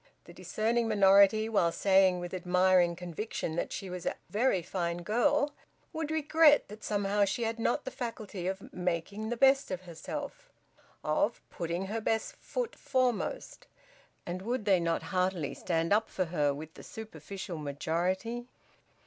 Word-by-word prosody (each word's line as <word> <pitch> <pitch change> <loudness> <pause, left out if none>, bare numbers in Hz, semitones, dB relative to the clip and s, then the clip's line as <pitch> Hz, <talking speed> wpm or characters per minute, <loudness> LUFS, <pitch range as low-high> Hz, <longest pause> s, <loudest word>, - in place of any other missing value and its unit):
The - - -14
discerning 230 +2 0
minority, 200 +1 +5
while 200 -7 +2
saying 190 -1 +4
with 175 0 -6
admiring 180 -1 +3
conviction 175 -1 -4
that - - -2
she 195 - -5
was 180 -1 -6
`a - - 0 0.2
very 210 -4 +2
fine 170 -1 -3
girl,' 285 - +2 0.4
would 320 -2 -3
regret 315 -2 +4
that 210 +1 -11
somehow 205 0 +1
she 200 +4 0
had 225 0 -2
not 240 +5 0
the 260 - -4
faculty 215 -6 -5
of 190 0 -1
`making 180 +5 -3
the 240 - -2
best 270 +2 +4
of 185 -1 -3
herself,' 185 - -7 0.5
of - - +1
`putting 170 +2 -2
her 220 +3 -3
best 220 0 -1
foot - - -4
foremost.' 260 - -1 0.6
And 180 +1 -4
would 235 +1 -2
they 195 -3 +4
not 170 -1 0
heartily 180 -5 0
stand 165 +1 0
up 220 +1 +2
for 185 - -1
her 150 -4 +1
with 155 +3 -7
the - - -12
superficial 190 -4 -7
majority! 180 - -2
195 Hz, 155 wpm, -31 LUFS, 175-230 Hz, 0.6 s, minority